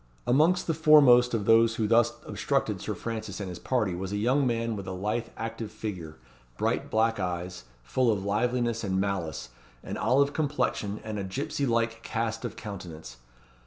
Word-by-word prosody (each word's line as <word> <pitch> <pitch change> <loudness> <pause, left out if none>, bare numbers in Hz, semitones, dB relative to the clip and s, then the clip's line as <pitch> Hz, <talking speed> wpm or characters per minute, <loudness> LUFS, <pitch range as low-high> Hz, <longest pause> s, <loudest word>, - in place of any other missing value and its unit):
Amongst 160 +8 +3
the 165 - 0
foremost 140 -6 +6
of 105 -3 -2
those 115 +1 +5
who 110 - 0
thus 115 +1 +4
obstructed - - -1
Sir - - -3
Francis 110 -4 -5
and 100 -2 -4
his 90 - -7
party 110 -8 0
was 95 +2 -4
a 105 - -1
young 130 +6 +2
man 115 -1 -1
with 100 -2 -7
a - - -3
lithe 105 +5 -2
active 115 -1 -5
figure, 90 -9 -6 0.4
bright - - -1
black 115 0 +1
eyes, 90 -7 -4 0.2
full 120 - +2
of 100 -2 -2
liveliness 120 +2 0
and 95 -2 0
malice, 85 -10 -2 0.3
an - - -5
olive 140 +2 +2
complexion, 125 -8 -1
and 110 -1 -4
a - - -3
gipsy 95 +8 -2
like 115 -1 0
cast 115 -1 -3
of 115 -3 -4
countenance. 90 -8 -8
115 Hz, 175 wpm, -28 LUFS, 100-120 Hz, 0.4 s, foremost